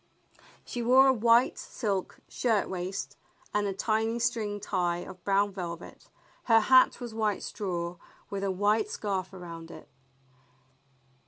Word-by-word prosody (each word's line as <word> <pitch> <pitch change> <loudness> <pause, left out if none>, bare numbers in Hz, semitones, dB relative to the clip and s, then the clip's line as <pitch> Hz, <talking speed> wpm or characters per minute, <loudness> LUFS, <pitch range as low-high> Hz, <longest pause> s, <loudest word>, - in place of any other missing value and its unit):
She 245 - -4
wore 260 +3 +6
a - - 0
w^hite 235 +2 +4
silk 200 -5 -3
shirt 225 -5 0
waist 185 +1 -5 0.4
and 210 -1 +1
a - - -1
tiny 220 +3 0
string 225 -4 -1
tie 180 -4 -1
of 180 -1 -11
brown 200 +1 +2
velvet. 170 -3 -7 0.4
Her 225 -2 +6
hat 255 +4 +5
was 240 -3 -6
white 215 -3 -1
straw 175 -3 -4 0.3
with 200 -1 -4
a 200 - 0
white 205 +3 +1
scarf 190 -3 -3
around 170 -3 -9
it. - - -11
205 Hz, 140 wpm, -29 LUFS, 185-225 Hz, 0.4 s, wore